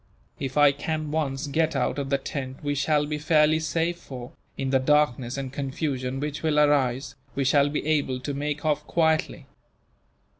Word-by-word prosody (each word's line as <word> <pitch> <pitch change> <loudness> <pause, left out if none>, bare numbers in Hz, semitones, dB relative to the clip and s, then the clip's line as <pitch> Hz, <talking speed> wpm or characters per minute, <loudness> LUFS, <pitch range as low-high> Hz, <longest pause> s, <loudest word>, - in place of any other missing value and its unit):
If 135 0 -4
I 145 -1 +7
can 155 +1 -3
once 150 -2 -1
get 155 +2 0
out 135 +2 0
of 140 -1 -3
the 140 - +2
tent 135 0 -6
we 145 0 0
shall 145 +1 +1
be 150 0 -3
fairly 155 0 +4
safe 165 +2 -1
for, 125 -5 -9 0.3
in 135 -1 -2
the 135 - +4
darkness 130 -3 +2
and 135 -1 -5
confusion 135 -2 -3
which 145 +1 -3
will 155 -2 +2
arise, 140 -3 +2 0.2
we 140 - 0
shall 140 +2 +4
be 145 - -3
able 145 -4 +1
to 145 +2 -3
make 150 +2 -3
off 150 -1 +1
quietly. 160 -2 +1
145 Hz, 180 wpm, -26 LUFS, 135-150 Hz, 0.3 s, I